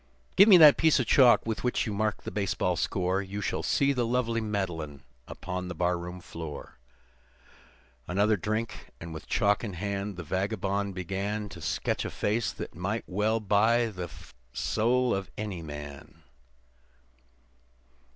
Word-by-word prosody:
Give 200 +3 +8
me 190 - +10
that 155 -4 +9
piece 160 -2 +4
of 130 - +1
chalk 125 +1 +5
with 110 -4 -3
which 125 - 0
you 110 - -3
mark 110 0 -1
the - - -5
baseball 95 -2 0
score 95 +2 0
You 100 +1 -6
shall 100 - -2
see 140 0 +2
the 125 -2 0
lovely 115 -1 0
Madeline 85 -10 -4 0.2
upon 90 +1 -5
the 90 - -6
barroon 90 +1 -2
floor." 80 -4 -8 1.3
Another 100 +5 +2
drink, 110 +4 -3
and 85 -1 -8
with 80 - -9
chalk 105 -1 +2
in 105 -5 -4
hand, 100 +1 -4
the 90 - -5
vagabond 100 +2 -2
began 100 +3 -3
To 85 -3 -10
sketch - - -1
a - - -3
face 110 +2 -1
that - - -8 0.3
well 105 +4 0
might 105 - -14
buy 110 +4 +4
the 90 -3 -6 0.4
soul 120 +3 +1
of 95 0 -3
any 100 -5 -4
man. 75 -2 -9
100 Hz, 150 wpm, -28 LUFS, 90-110 Hz, 1.3 s, me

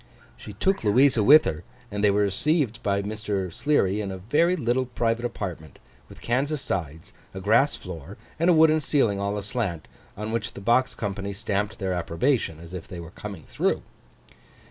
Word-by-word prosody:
She 105 - -10
took 190 - 0
Louisa 120 +3 +4
with 150 +7 +8
her; 80 +1 -3 0.3
and 105 0 -3
they 105 - +6
were 100 +1 +3
received 120 - +1
by 100 -1 0
Mr. 100 -4 -3
Sleary 105 - +1
in 100 - -4
a 95 - -5
very 150 - +2
little 125 -3 0
private 120 -1 -1
apartment, 90 -9 -6 0.3
with - - -14
canvas 140 +5 0
sides, 80 - -4 0.2
a - - -4
grass 110 +9 +3
floor, 85 -6 -9 0.2
and 170 +2 +3
a - - +7
wooden 155 -1 +5
ceiling 135 -8 +1
all 100 +1 -1
aslant, 100 -5 -3 0.3
on 105 +2 -4
which 115 -2 -3
the - - -7
box 120 +5 +2
company 100 -1 -4
stamped 105 0 -2
their 95 -3 -2
approbation, 85 - 0
as 85 +1 -11
if 90 -3 -7
they 90 -3 -8
were 85 0 -9
coming 100 -5 -8
through. - - -1
105 Hz, 180 wpm, -25 LUFS, 95-125 Hz, 0.3 s, with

